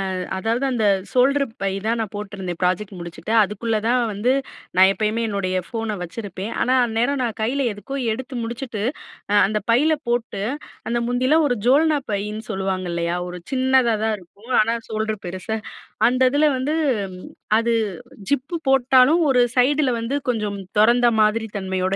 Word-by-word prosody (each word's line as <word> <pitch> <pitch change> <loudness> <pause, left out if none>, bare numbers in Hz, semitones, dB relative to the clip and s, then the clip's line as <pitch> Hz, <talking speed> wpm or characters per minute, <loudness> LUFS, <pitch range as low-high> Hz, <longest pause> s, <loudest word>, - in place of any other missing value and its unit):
அ - - -3 0.2
அதாவது 225 +6 -1
அந்த 230 -4 0 0.3
shoulder 275 +3 +3 0.2
by 195 - +1 0.2
தான் 230 +2 +1
நான் 220 -3 -3
போட்ருந்தேன் 195 -4 -5
ப்ராஜெக்ட் 185 +3 0
முடிச்சுட்டு. 170 +4 -7
அதுக்குள்ள 215 +3 -2
தான் 245 +2 +3
வந்து 210 +6 +1 0.4
நான் 190 +1 +7
எப்பயுமே 215 +2 -1
என்னுடைய 195 -3 -2
ஃபோன 225 -2 -3
வச்சிருப்பேன். 195 +3 -6
ஆனா 255 - +2
அந்நேரம் 240 +5 0
நான் 230 -1 -3
கையில 260 +5 0
எதுக்கோ 270 +7 -7 0.2
எடுத்து 260 +4 -5
முடிச்சுட்டு, 235 -2 -4 0.6
அந்த 210 +2 0
பையில 295 +7 +4 0.2
போட்டு 240 -4 -1 0.5
அந்த 240 - 0
முந்தில 255 +6 +2
ஒரு 245 - +1
ஜோல்னா 305 +3 +4
பைன்னு 210 +2 -3
சொல்லுவாங்க 190 -1 -2
இல்லயா? 170 0 -1
ஒரு 180 0 -7
சின்னதா 260 -3 +3
தான் 220 0 +1
இருக்கும். 200 +7 -14
ஆனா 230 +2 +1
சோல்டர் 215 -1 -2
பெருசா 185 +5 -4 0.5
அந்த 255 +2 0
இதுல 290 +3 +2
வந்து 275 +4 -1 0.8
அது 230 +1 +1 0.6
ஜிப்பு 285 +4 -1
போட்டாலும் 265 +3 +5
ஒரு 255 -2 +4 0.2
சைடுல 275 +3 +3
வந்து, 230 +5 -2
கொஞ்சம் 210 -4 -1 0.2
தொறந்த 240 +3 +5
மாதிரி 215 +1 +3
தன்மையோட 190 -1 -1
225 Hz, 150 wpm, -22 LUFS, 200-255 Hz, 0.8 s, நான்